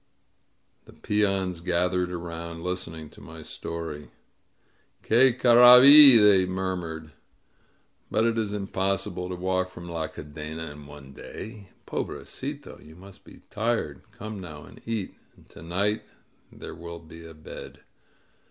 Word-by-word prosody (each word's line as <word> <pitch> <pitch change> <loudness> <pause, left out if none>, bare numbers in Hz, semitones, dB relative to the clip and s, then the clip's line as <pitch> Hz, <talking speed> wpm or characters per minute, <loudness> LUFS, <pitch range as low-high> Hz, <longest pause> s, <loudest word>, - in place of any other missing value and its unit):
The - - -16
peons 95 -4 -1
gathered 90 +1 0
around, 85 -1 -7
listening 85 -4 -5
to - - -16
my 80 0 -11
story. 80 -3 -7 0.9
Qiie 125 +2 +3
carrai 125 +1 +8
iri 140 -3 +10
il^ 105 -2 +6
they 95 -2 +5
murmured. 90 -4 -4 1.0
But 110 - +1
it 115 -1 +1
is 110 -3 -2
im 100 -1 -4
possible 95 -1 -2
to 90 - -4
walk 95 +1 -1
from 85 -1 -11
La 80 -2 -4
Cadena 75 +1 -8
in 75 -1 -13
one 70 -2 -13
day! 105 - -10 0.2
Pobre - - -5
cito! 145 +1 -8
You 80 +1 -15
must 95 +2 -15
be - - -16
tired! 110 - -2
Come 110 -1 -8
now 80 -4 -10
and - - -15
eat. 110 -4 -3 0.2
And - - -22
to - - -14
night 95 +6 -1 0.5
there - - -10
will 85 0 -9
be 85 0 -13
a 80 -1 -12
bed.'' 75 - -11
90 Hz, 145 wpm, -26 LUFS, 80-105 Hz, 1.0 s, iri